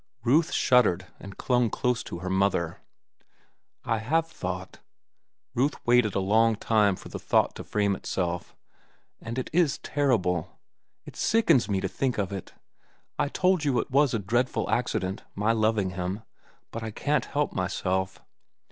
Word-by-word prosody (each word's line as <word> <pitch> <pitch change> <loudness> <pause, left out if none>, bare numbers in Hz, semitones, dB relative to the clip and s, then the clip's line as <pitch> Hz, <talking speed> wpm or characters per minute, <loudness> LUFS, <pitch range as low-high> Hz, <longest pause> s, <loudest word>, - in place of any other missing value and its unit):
Ruth 150 +7 +3
shuddered 105 -8 +3
and 100 -1 -10
clung 125 -2 +2
close 125 +3 0
to - - -6
her 95 - -4
mother. 95 -4 +1 1.1
"I 115 - 0
have 160 +9 +1
thought." 95 - -6 0.7
Ruth 135 +4 +1
waited 120 -3 +3
a - - +2
long 110 +4 +3
time 105 -2 +2
for - - -11
the - - -6
thought - - +2
to - - -8
frame 100 -2 0
itself. 90 -2 -3 0.7
"And 115 +2 -6
it 130 - -3
is 165 -4 +3
terrible. 105 - 0 0.5
It - - -11
sickens 210 - +3
me 100 -2 +1
to - - -1
think 130 -2 -2
of 100 -2 -1
it. 95 - -7 0.6
I - - +1
told 185 0 +2
you 140 -4 +1
it - - -4
was 140 -2 +3
a - - +2
dreadful 120 +5 0
accident, 95 +1 -1
my 105 +3 +2
loving 110 -4 +1
him; 90 +4 -4 0.5
but 115 - -5
I 110 - -4
can't 145 +5 0
help 145 0 -1
myself. 95 0 -2
110 Hz, 155 wpm, -27 LUFS, 95-130 Hz, 1.1 s, Ruth